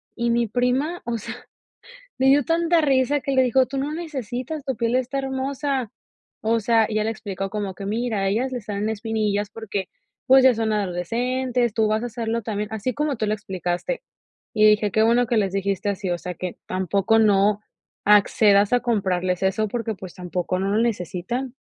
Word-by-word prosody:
y 235 0 -1
mi 235 0 +2
prima, 255 - 0
o 235 -1 -2
sea, 215 - -6 0.9
le 260 - +2
dio 280 +1 +5
tanta 335 +2 +2
risa 275 -1 +2
que 275 - -3
le 260 -1 +4
dijo: 255 +1 +3
"Tú 275 - -5
no 285 +3 -2
necesitas, 285 -3 -5
tu 265 -2 -2
piel 230 +2 0
está 260 +2 -1
hermosa". 270 -2 -2 0.5
O 225 +1 +1
sea, 225 0 +3
ella 215 -1 0
le 225 - 0
explicó 195 -3 -5
como 200 -3 -3
que 200 - -7
mira, 220 +1 -1
a 195 - +1
ellas 240 +6 0
le 250 -2 -4
salen 205 0 -3
espinillas 215 -2 -1
porque, 205 -4 -4 0.4
pues, 265 0 +7
ya 260 -1 +7
son 220 -1 0
adolescentes, 235 +6 -1
tú 220 - +3
vas 215 +2 0
a 245 - -3
serlo 230 0 -2
también, 210 -1 -3
así 220 +4 -2
como 295 -3 -1
tú 215 - -1
lo 210 - +1
explicaste. 190 - -3 0.5
Y 215 -1 +4
dije: 210 0 +4
"Qué 220 +3 +3
bueno 235 +2 +3
que 230 0 +1
les 195 -3 +1
dijiste 195 0 -1
así, 195 -1 -3
o 175 - 0
sea, 180 +1 -6
que 180 +1 -5
tampoco 195 +4 +1
no 205 -1 +3 0.4
accedas 205 +1 +5
a 245 - +5
comprarles 185 -5 0
eso 195 +3 +1
porque, 225 +1 -3
pues, 185 -2 -10
tampoco 180 0 -3
no 195 +1 -1
lo - - +3
necesitan". 235 +4 -2
220 Hz, 195 wpm, -23 LUFS, 200-255 Hz, 0.9 s, pues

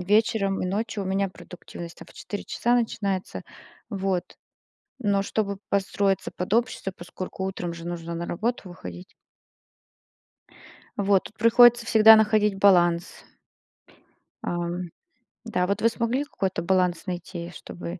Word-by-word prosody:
вечером 200 0 +2
и - - -1
ночью. 210 +2 -2
У - - -5
меня 195 +1 0
продуктивность 175 -2 -10
там - - -11
в - - -19
4 205 - -6
часа 240 +1 0
начинается, 200 -5 -1 0.5
вот. 190 -3 -1 0.8
Но 200 -4 +1
чтобы 200 -1 -2
подстроиться 195 0 0
под 180 +2 -4
общество, 230 -4 0
поскольку 185 +2 -6
утром 180 -3 -4
же 170 0 -8
нужно 170 -1 -5
на 170 +1 -3
работу 215 0 -2
выходить. 90 - -10 1.8
Вот, 200 -1 +2
тут 215 - -12
приходится 235 +1 +6
всегда 220 -1 +8
находить 215 -2 +3
баланс. 175 -3 +3 1.2
Ам, 175 0 -3 0.6
да, 180 -5 0
вот 200 - -1
вы 230 - +5
смогли 235 +4 -1
какой-то 190 -10 -3
баланс 180 -1 +1
найти, 175 -1 -5
чтобы 175 +2 -8
195 Hz, 130 wpm, -25 LUFS, 175-215 Hz, 1.8 s, всегда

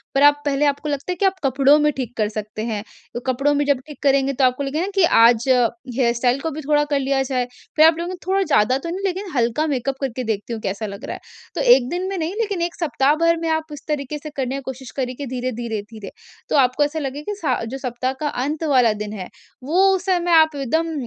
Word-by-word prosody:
पर 275 - +4
आप 290 0 +5
पहले 285 0 +1
आपको 285 +1 0
लगता 285 +5 -3
है - - -2
कि 390 - 0
आप 385 0 +2
कपड़ों 275 +2 +4
में 300 0 +3
ठीक 250 -2 -4
कर 215 -2 +1
सकते 215 0 -6
हैं। 215 -3 -3 0.3
तो - - -3
कपड़ों 275 +3 +2
में 290 0 +1
जब 285 -2 +2
ठीक 295 - -11
करेंगे 275 -1 +3
तो 270 - 0
आपको 255 +2 +1
लगेगा 310 +7 -2
कि 390 - +4 0.2
आज 235 +1 +5
हेयर 240 0 +1
स्टाइल 245 +2 +1
को 325 - -2
भी 310 +2 -6
थोड़ा 295 +1 +2
कर 285 - +2
लिया 270 0 0
जाए, 255 -2 -1 0.3
फिर 310 - +7
आप 325 - +7
कहोगे 345 +2 -4
थोड़ा 385 +1 +2
ज़्यादा 260 - +3
तो 305 +5 -6
नहीं 370 +3 -4
लेकिन 385 +1 -2
हल्का 240 +5 +1
मेकअप 275 -2 -1
करके 255 -2 -3
देखती 220 0 -3
हूँ 220 - -5
कैसा 200 +2 -3
लग 200 0 -7
रहा - - -4
है। - - -10 0.4
तो - - -1
1 245 -2 -1
दिन 360 +3 -2
में 390 - -3
नहीं, 330 +1 -2
लेकिन 405 -6 -1
1 345 0 -2
सप्ताह 290 -4 +2
भर 335 +1 +2
में 330 - -3
आप 320 0 +1
इस 290 - -9
तरीके 295 -1 -3
से 305 +1 -8
करने 265 0 -1
की 275 - -4
कोशिश 265 -2 -7
करें 255 -1 -2
कि 285 - -6
धीरे-धीरे-धीरे 230 -4 -5 0.4
तो - - +1
आपको 255 +1 +3
ऐसा 295 +2 -2
लगेगा 290 +6 -4
कि - - -4
स 230 - 0
जो 265 - -5
सप्ताह 255 -1 -3
का 305 - -1 0.2
अंत 300 +4 -3
वाला 250 -5 +4
दिन 210 0 -6
है 190 -4 -7 0.3
वो 360 +8 +3
उस 365 -1 -5
समय 355 -2 +1
आप 315 -2 +5
एकदम 320 +5 -1
275 Hz, 250 wpm, -21 LUFS, 245-315 Hz, 0.4 s, फिर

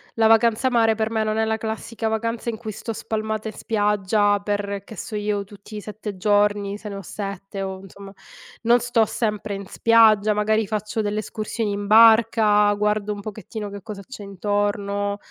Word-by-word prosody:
la 225 -1 +4
vacanza 225 +2 +4
mare, 230 -2 +3
per 220 0 -1
me, 220 -1 0
non 215 0 -1
è 220 - +2
la 220 0 0
classica 225 +1 -4
vacanza 230 +1 -2
in 225 - -4
cui 220 -1 -6
sto 225 +2 -6
spalmata 220 0 -3
in 220 - -6
spiaggia 205 -1 +1
per, 200 -1 -3
che 220 - -11
so 210 - -6
io, 205 -1 -1
tutti 205 +1 -11
i - - -5
7 210 -1 -7
giorni, 205 +1 +1
se 210 -1 -8
ne 200 - -6
ho 195 - -6
7 195 0 -6
o, 190 0 -5
insomma, 195 +1 -12 0.5
non 235 +1 +5
sto 240 -2 +2
sempre 210 -2 -2
in 200 0 -7
spiaggia, 215 -1 +4
magari 215 +1 +1
faccio 215 +1 -2
delle 210 0 -1
escursioni 215 0 -3
in 200 0 -3
barca, 220 -1 +6
guardo 210 0 0
un 205 - -8
pochettino 215 0 -7
che 200 -1 -8
cosa 205 -2 -8
c'è 260 -5 -9
intorno. 205 0 -1
210 Hz, 190 wpm, -23 LUFS, 205-220 Hz, 0.5 s, barca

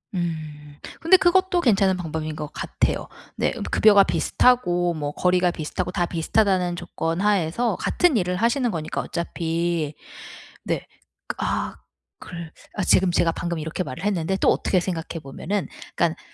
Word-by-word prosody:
음. 155 -4 -5 0.2
근데 335 +3 +6
그것도 370 0 +3
괜찮은 195 - +3
방법인 155 -3 -4
것 150 - -5
같아요. - - -2 0.3
네 - - +1 0.2
급여가 205 -2 +6
비슷하고 175 -8 +2
뭐 145 -2 -3
거리가 180 +2 +2
비슷하고 170 +2 -4
다 175 -2 0
비슷하다는 180 +1 +1
조건 170 0 -3
하에서 205 +3 +1
같은 350 -9 +2
일을 180 -2 0
하시는 235 +4 +1
거니까 155 -4 -3
어차피 170 -2 -2 0.7
네. - - -2 0.5
아 - - -2 0.4
글 170 -2 -8 0.2
아 195 - -1
지금 185 0 +4
제가 170 -1 +2
방금 170 0 -3
이렇게 160 +4 -3
말을 165 +2 -7
했는데 190 -2 0
또 - - +3
어떻게 185 - +1
생각해 170 -2 -4
보면은 185 +8 -3 0.3
그러니까 170 -1 +1
175 Hz, 325 characters per minute, -23 LUFS, 165-200 Hz, 0.7 s, 근데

